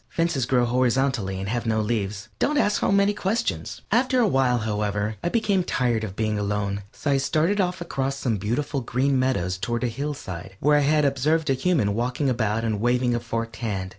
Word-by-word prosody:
Fences 165 -7 0
grow 125 -2 +3
horizontally 125 -5 +1
and 95 - -4
have 120 +2 -2
no 110 -1 +1
leaves. 105 -1 -2
Don't 295 - +1
ask 210 -7 +2
so - - +2
many 200 +1 +3
questions! 220 +4 -2
After 255 +3 +3
a 240 - +4
while, 130 -7 +2
however, 105 -1 -2
I - - +1
became 205 -3 +1
tired 120 -8 0
of 100 -3 -5
being 110 -1 -1
alone, 100 -1 -1
so 145 - -2
I 140 - +3
started 160 +9 +1
off 180 0 -2
across 135 -5 -2
some 125 -5 -1
beautiful 130 +8 -2
green 130 +3 +1
meadows 90 -9 0
toward 120 +6 -2
a - - +2
hillside, 110 - -5
where 150 +1 +4
I - - +3
had 150 -1 +3
observed 145 +3 +1
a - - +4
human 130 - +1
walking 125 +4 0
about 115 -2 0
and 110 -3 -1
waving 120 +1 +2
a 120 - 0
forked 115 0 -4
wand. 95 -5 -2
125 Hz, 200 wpm, -24 LUFS, 110-150 Hz, -, a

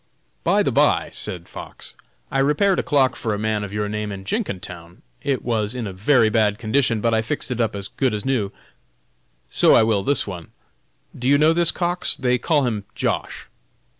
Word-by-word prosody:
"By - - +3
the - - 0
by," - - +2
said 85 -2 -4
Fox, - - -9 0.4
"I - - 0
repaired 150 +8 +2
a - - +3
clock 135 -5 +2
for 110 -3 -2
a - - -4
man 110 0 -1
of 100 - -6
your 105 0 -2
name 105 0 -3
in 95 -1 -7
Jenkintown; 90 - -5 0.2
it 135 -2 -1
was 110 -1 -1
in 120 -3 -3
a 100 - -5
very 115 +5 +3
bad 105 -1 +2
condition, 115 0 +1
but 115 0 +1
I 110 - +3
fixed 130 +3 -3
it 120 -1 -1
up 110 -2 0
as 100 -1 -5
good 130 +1 -1
as 105 - -5
new; 120 -7 0 1.0
so - - +5
I - - +6
will 110 -3 +2
this 140 +5 +1
one. 90 -5 -7 0.7
Do 125 - -3
you 140 +1 +5
know 155 +2 +4
this 170 -1 +3
Cox? 175 0 -1
they 125 -1 +1
call 145 0 +2
him 105 -5 -2
Josh. - - -2
115 Hz, 200 wpm, -22 LUFS, 105-135 Hz, 1.0 s, I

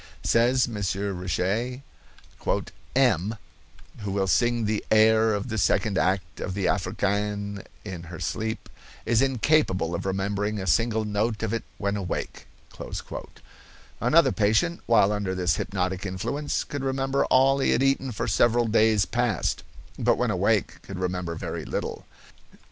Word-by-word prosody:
Says 125 +3 +3
M. 120 - -7 0.5
Richet: 105 +9 -1 1.1
"M——, 110 -6 +2 0.6
who 105 -2 -4
will 100 0 +1
sing 120 +4 +2
the 105 0 -1
air 110 0 +5
of 105 +5 -4
the 110 -1 -2
second 100 +1 +2
act 90 -4 0
of 95 - -4
the 100 -2 -1
Africaine 100 +1 -1 0.2
in 95 -4 -6
her 85 0 -9
sleep, 110 +7 -3 0.4
is 115 +1 +3
incapable 130 - +2
of 85 - -3
remembering 100 +2 -1
a 95 - -4
single 110 - +2
note 105 +2 -1
of 110 0 -1
it 115 - -2
when 100 0 -1
awake." 95 -4 -4 1.5
Another 155 -4 +4
patient, 110 +12 +1
while 110 -3 +5
under 100 -3 -2
this 90 0 +1
hypnotic 95 -1 -2
influence, 105 +10 -2
could 145 -1 -5
remember 135 0 0
all 135 +1 +4
he 135 - +2
had - - +3
eaten 135 -1 +1
for 105 - -3
several 120 0 +3
days 110 -2 +3
past, 120 -5 0 0.4
but - - +3
when - - +1
awake - - +1
could 95 - -8
remember 90 -2 -2
very - - -5
little. - - -4
105 Hz, 145 wpm, -26 LUFS, 95-120 Hz, 1.5 s, air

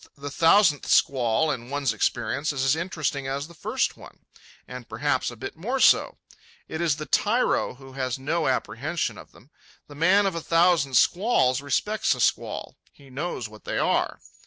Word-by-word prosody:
The 140 0 -7
thousandth 165 0 +4
squall 130 +3 +2
in 120 -3 -6
one's 140 -3 -1
experience 145 +3 -1
is 135 -2 -2
as 135 - +3
interesting 155 -5 -3
as 140 +2 -3
the 170 - -15
first 155 - -2
one, - - -16 0.4
and 125 -2 -9
perhaps 130 +4 -1
a 120 - -9
bit 125 +4 -7
more 235 +12 -3
so. - - +4 0.5
It 160 - -5
is 165 -4 +2
the 155 0 -6
tyro 220 - +1
who 135 0 -14
has 130 -2 -3
no 155 +5 -1
apprehension 130 0 -2
of - - -14
them. 130 +8 -21 0.3
The 145 - -13
man 185 +7 +3
of 195 - 0
a 165 - -4
thousand 165 -5 +2
squalls 155 - +3
respects 145 - 0
a - - -10
squall. - - -1
He 140 -2 -19
knows 135 -3 -4
what 110 0 -15
they - - -3
are. - - 0
145 Hz, 180 wpm, -25 LUFS, 130-170 Hz, 0.5 s, thousandth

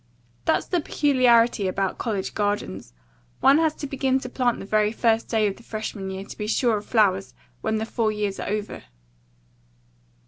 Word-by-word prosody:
That's - - +2
the 355 -2 0
peculiarity 240 -8 +3
about 190 0 -2
college 205 -5 -2
gardens. 205 - -2 0.5
One 280 +3 +5
has 320 -1 +2
to - - -6
begin 270 -1 0
to 250 - -6
plant 250 -2 0
the - - -8
very 210 +1 +2
first 225 0 +1
day 220 -2 +2
of 200 -2 -1
the - - -15
freshman 215 -4 -5
year 190 0 -5
to - - -11
be 210 - -3
sure 230 0 +2
of 205 - -8
flowers 195 -4 +2 0.3
when 220 0 -1
the 220 - -2
four 225 -1 0
years 210 -2 -3
are - - -4
over. 210 0 -4
220 Hz, 180 wpm, -24 LUFS, 205-245 Hz, 0.5 s, One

